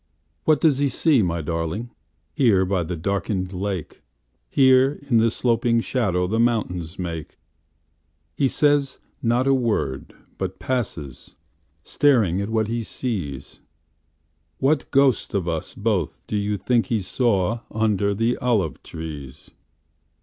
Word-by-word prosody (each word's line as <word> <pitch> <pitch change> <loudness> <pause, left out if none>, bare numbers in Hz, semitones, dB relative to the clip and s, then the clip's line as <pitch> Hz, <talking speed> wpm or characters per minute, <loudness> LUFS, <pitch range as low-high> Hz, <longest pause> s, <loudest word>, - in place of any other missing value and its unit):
What 155 -2 +4
does 150 -5 +3
he 140 -1 +2
see, 135 0 +3
my 85 -3 -1
darlingHere 85 - -1
by 95 -1 +1
the 85 +1 -3
darkened 95 +1 -2
lake? 95 -3 -4 0.5
Here, 130 +1 +4
in 120 -4 +3
the 115 +1 +4
sloping 115 0 +1
shadowThe 110 -3 0
mountains 95 -7 -1
make? 85 -5 -5 1.0
He 140 - +2
says 145 -1 +2 0.2
not 120 +2 +2
a 135 - +4
word, 110 - -1 0.2
but 95 0 -3
passes, 85 - -4 0.5
Staring 110 - +2
at 100 - -3
what 110 -1 +1
he 115 +1 -2
sees. 95 - -5 1.0
What 140 +1 +1
ghost 135 -6 +2
of 95 -3 -1
us 80 -2 -3
both 100 -6 -1
do - - -4
you 105 0 0
think 120 +2 +1
he 115 - +1
sawUnder 105 -1 0
the 115 +2 +1
olive 110 -10 0
trees? 75 -4 -9
105 Hz, 125 wpm, -23 LUFS, 90-125 Hz, 1.0 s, What